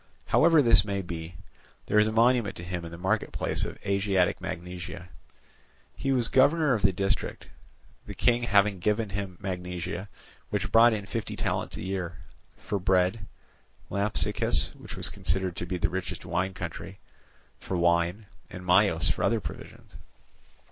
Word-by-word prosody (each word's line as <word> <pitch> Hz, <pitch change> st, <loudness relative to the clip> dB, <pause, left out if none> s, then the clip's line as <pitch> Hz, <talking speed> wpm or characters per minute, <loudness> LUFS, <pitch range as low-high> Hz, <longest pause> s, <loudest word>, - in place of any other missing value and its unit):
However 165 Hz, -3 st, +5 dB
this 115 Hz, -2 st, +6 dB
may 100 Hz, -2 st, -3 dB
be, 85 Hz, -1 st, -7 dB, 0.5 s
there 105 Hz, -, +3 dB
is 105 Hz, -, +4 dB
a -, -, -1 dB
monument 115 Hz, -1 st, +3 dB
to 85 Hz, -, -8 dB
him 90 Hz, -1 st, -4 dB
in -, -, -7 dB
the 85 Hz, -, -8 dB
marketplace 95 Hz, +5 st, -1 dB
of -, -, -7 dB
Asiatic 100 Hz, -2 st, +1 dB
Magnesia. 90 Hz, +1 st, -6 dB, 0.9 s
He 135 Hz, -, -1 dB
was 125 Hz, -4 st, +3 dB
governor 145 Hz, +3 st, +4 dB
of 110 Hz, -, 0 dB
the 95 Hz, 0 st, +4 dB
district, 95 Hz, +1 st, -2 dB, 0.6 s
the -, -, -7 dB
King 120 Hz, -1 st, +2 dB
having 100 Hz, -4 st, +3 dB
given 105 Hz, +3 st, 0 dB
him 95 Hz, -2 st, -4 dB
Magnesia, 90 Hz, 0 st, -5 dB, 0.4 s
which -, -, -2 dB
brought 115 Hz, +1 st, +7 dB
in 105 Hz, -2 st, -3 dB
fifty 115 Hz, +2 st, -4 dB
talents -, -, -2 dB
a -, -, -6 dB
year, 95 Hz, -3 st, -4 dB, 0.4 s
for 100 Hz, -, -3 dB
bread, 95 Hz, +3 st, +1 dB, 0.6 s
Lampsacus, 100 Hz, +1 st, +1 dB
which -, -, -10 dB
was -, -, +1 dB
considered 95 Hz, +1 st, 0 dB
to 85 Hz, -, -4 dB
be 90 Hz, -, -2 dB
the 85 Hz, -, +1 dB
richest 90 Hz, +1 st, -5 dB
wine 95 Hz, +2 st, -1 dB
country, 90 Hz, +2 st, -6 dB, 0.6 s
for 95 Hz, -, -3 dB
wine, 85 Hz, +4 st, +1 dB, 0.2 s
and 90 Hz, 0 st, -9 dB
Myos 90 Hz, -3 st, +3 dB
for -, -, -3 dB
other 115 Hz, -1 st, +2 dB
provisions. -, -, -10 dB
95 Hz, 155 wpm, -27 LUFS, 90-105 Hz, 0.9 s, brought